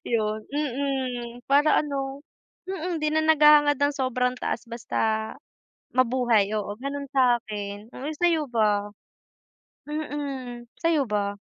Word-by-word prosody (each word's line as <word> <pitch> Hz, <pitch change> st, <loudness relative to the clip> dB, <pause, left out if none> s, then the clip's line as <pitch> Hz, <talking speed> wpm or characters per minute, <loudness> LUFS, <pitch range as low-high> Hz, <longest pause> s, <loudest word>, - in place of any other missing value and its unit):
yun. 215 Hz, -2 st, -1 dB
Mm, 260 Hz, -4 st, -3 dB
para 290 Hz, +2 st, +4 dB
ano 275 Hz, -1 st, -3 dB, 0.5 s
mm, 355 Hz, -2 st, -3 dB
'di 305 Hz, -, +2 dB
na 315 Hz, -, +3 dB
naghahangad 300 Hz, -2 st, +6 dB
ng 285 Hz, 0 st, +2 dB
sobrang 255 Hz, -1 st, 0 dB
taas 235 Hz, -, -3 dB
basta 235 Hz, 0 st, -5 dB, 1.0 s
mabuhay. 240 Hz, -5 st, +3 dB
Oo, 205 Hz, 0 st, -3 dB
gano'n 280 Hz, +1 st, -4 dB
sa 255 Hz, -3 st, +4 dB
akin. 205 Hz, 0 st, -7 dB
Uy, 285 Hz, +4 st, -4 dB
sa'yo 330 Hz, -3 st, +2 dB
ba? 210 Hz, -3 st, +2 dB, 1.0 s
Mm, 280 Hz, -5 st, -4 dB, 0.2 s
sa'yo 330 Hz, -4 st, +2 dB
ba? 205 Hz, -1 st, -1 dB
260 Hz, 120 wpm, -25 LUFS, 230-290 Hz, 1.0 s, naghahangad